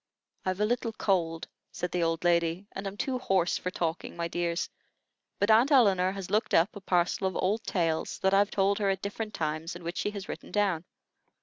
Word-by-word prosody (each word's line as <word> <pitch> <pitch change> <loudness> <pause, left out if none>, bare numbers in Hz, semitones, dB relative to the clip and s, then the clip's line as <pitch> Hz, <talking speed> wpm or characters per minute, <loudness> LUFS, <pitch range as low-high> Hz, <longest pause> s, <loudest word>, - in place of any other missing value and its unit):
"I've 185 +1 -1
a 210 - +3
little 235 0 -1
cold," 165 -6 0 0.2
said 180 -1 -4
the 180 - 0
old 165 0 0
lady, 170 +1 +2
"and 195 +1 -5
am 195 +1 -6
too 255 +3 -1
hoarse 190 -7 +1
for 180 - -2
talking, 170 -2 -3
my 170 0 -1
dears; 170 0 -1 0.7
but 205 +2 +3
Aunt 230 +5 +6
Elinor 195 -8 +5
has 195 -2 -6
looked 215 +2 +2
up 170 +6 +3
a 205 - -8
parcel 180 +1 +1
of 185 - -4
old 210 +4 0
tales 165 -4 0
that 190 0 +3
I've 200 +1 +4
told 200 +1 +1
her 200 -2 +1
at 190 -1 -1
different 210 +1 -4
times 155 +2 -2
and 175 -1 -10
which 170 +1 -4
she - - 0
has 200 -2 -7
written - - -7
down. 195 -5 +1
190 Hz, 210 wpm, -29 LUFS, 170-205 Hz, 0.7 s, Aunt